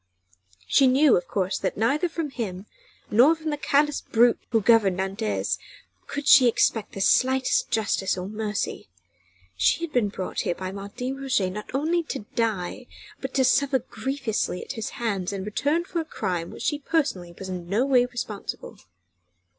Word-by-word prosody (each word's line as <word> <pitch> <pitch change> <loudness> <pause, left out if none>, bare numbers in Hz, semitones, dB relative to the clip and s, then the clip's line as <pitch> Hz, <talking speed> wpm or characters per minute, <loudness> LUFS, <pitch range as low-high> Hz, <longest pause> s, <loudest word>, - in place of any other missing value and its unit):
She 275 - +4
knew, 270 +2 +5
of 175 - -1
course, 190 -1 -1
that 190 - -2
neither 280 - +1
from 325 -3 -4
him, 195 -7 -5 0.5
nor 255 +10 +6
from 320 -1 -4
the - - 0
callous 295 0 +1
brute 235 +1 +3
who 230 - +3
governed 210 -4 +4
Nantes, 195 +3 -2 0.5
could 285 0 -5
she 260 -4 +8
expect 225 -2 +1
the 195 - -5
slightest 260 - +3
justice 200 -3 0
or 180 0 -4
mercy. 210 0 -3 0.7
She 95 - +2
had 335 - -4
been 230 -5 +2
brought 190 -2 -5
here 175 - -1
by 185 +1 -5
Martin 230 +7 -6
Roget 250 -9 0
not 210 +2 -7
only 325 +5 +1
to 270 -8 -5
die, 225 0 -2 0.3
but 265 -1 -6
to 265 - +4
suffer 270 +2 +3
grievously 240 -5 -3
at - - -6
his 225 -5 -4
hands 200 -6 -2
in 195 -1 -4
return 290 - 0
for 350 - -3
a - - -4
crime 175 - -3
for - - -10
which - - -8
she 295 - 0
personally 275 - -1
was 190 - -7
in 175 -2 -6
no 220 +7 +2
way 250 -3 +4
responsible. 230 -5 -6
230 Hz, 175 wpm, -25 LUFS, 195-275 Hz, 0.7 s, she